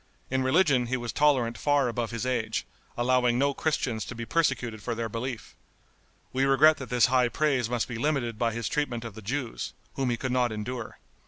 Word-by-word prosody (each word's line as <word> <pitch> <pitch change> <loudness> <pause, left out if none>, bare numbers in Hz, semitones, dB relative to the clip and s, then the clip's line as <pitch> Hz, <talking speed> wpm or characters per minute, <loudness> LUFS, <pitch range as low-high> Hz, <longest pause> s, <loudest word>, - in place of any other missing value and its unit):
In 130 0 +1
religion 130 -2 +3
he 130 +2 0
was 120 -1 -5
tolerant 130 -6 +2
far 145 -3 +2
above 120 -1 -2
his 115 +1 -4
age, 125 -4 -1 0.3
allowing 125 0 +2
no 140 +2 +2
Christians 130 -7 -1
to 125 - -7
be 115 0 -5
persecuted 125 -8 0
for 120 +2 -3
their 115 0 -3
belief. 115 +2 -5 0.8
We 130 +1 +1
regret 140 +3 +5
that 135 - -8
this 125 -1 +4
high 125 -1 +3
praise 135 -5 +1
must 120 -2 -1
be 120 -2 -5
limited 120 -6 -1
by 115 -1 +2
his 115 0 -3
treatment 125 -6 -2
of 115 - -6
the 110 - -10
Jews, 115 -3 -4 0.2
whom 135 -2 -1
he 120 - 0
could 130 +1 -3
not 125 -2 +2
endure. 110 +2 -5
125 Hz, 200 wpm, -27 LUFS, 115-135 Hz, 0.8 s, regret